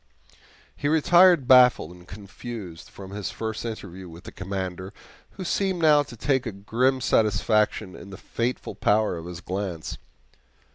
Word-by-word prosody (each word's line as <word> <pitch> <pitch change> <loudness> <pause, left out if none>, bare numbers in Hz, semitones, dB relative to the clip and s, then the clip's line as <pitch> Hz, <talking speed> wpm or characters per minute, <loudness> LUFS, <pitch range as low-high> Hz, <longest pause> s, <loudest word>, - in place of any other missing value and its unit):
He 145 - -3
retired 170 -1 +5
baffled 125 -9 +6
and 90 0 -15
confused 100 -2 -9
from 95 -1 -11
his 100 -3 -4
first 110 -1 -5
interview 95 -5 -7
with 85 +2 -12
the - - -10
Commander, 95 -1 -5 0.4
who 190 - -7
seemed 190 0 -1
now 150 -2 +6
to 130 -5 -9
take 130 0 0
a - - -3
grim 120 +7 0
satisfaction 105 -3 +1
in 100 - -11
the 95 - -9
fateful 120 +2 -3
power 105 -2 +1
of 85 0 -7
his 90 0 -8
glance. 90 -4 -5
105 Hz, 150 wpm, -25 LUFS, 95-130 Hz, 0.4 s, baffled